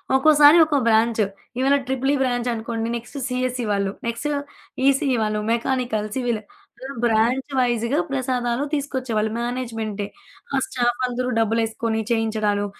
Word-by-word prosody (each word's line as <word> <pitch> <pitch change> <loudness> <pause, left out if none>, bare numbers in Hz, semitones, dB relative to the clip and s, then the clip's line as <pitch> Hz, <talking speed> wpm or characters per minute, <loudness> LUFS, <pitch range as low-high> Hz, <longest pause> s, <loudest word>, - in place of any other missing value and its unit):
ఒక్కోసారి 295 +3 +7
ఒక్కో 305 -2 +1
బ్రాంచ్. 225 0 +3 0.4
ఇవాళ 270 +2 +4
ట్రిపుల్ 265 +1 0
ఈ - - +3
బ్రాంచ్ 245 -2 0
అనుకోండి. 225 0 -3
నెక్స్ట్ 235 +4 -7
సీఎస్ఈ 250 -1 -2
వాళ్ళు. 200 -1 0 0.2
నెక్స్ట్ 235 +5 -2 0.6
ఈసీఈ 275 -1 +3
వాళ్ళు, 215 0 -1
మెకానికల్, 235 -2 0
సివిల్ 245 -4 0 0.7
బ్రాంచ్ 235 +4 +2
వైస్‌గా 240 +3 +1
ప్రసాదాలు 255 -1 -1
తీసుకొచ్చేవాళ్ళు 255 -7 -1
మేనేజ్‌మెంటే. 225 -4 -3 0.5
ఆ - - +2
స్టాఫ్ 240 -1 0
అందరూ 250 +1 -2
డబ్బులేసుకొని, 225 0 0
చేయించడాలు 215 -3 +1
240 Hz, 120 wpm, -22 LUFS, 225-260 Hz, 0.7 s, ఒక్కోసారి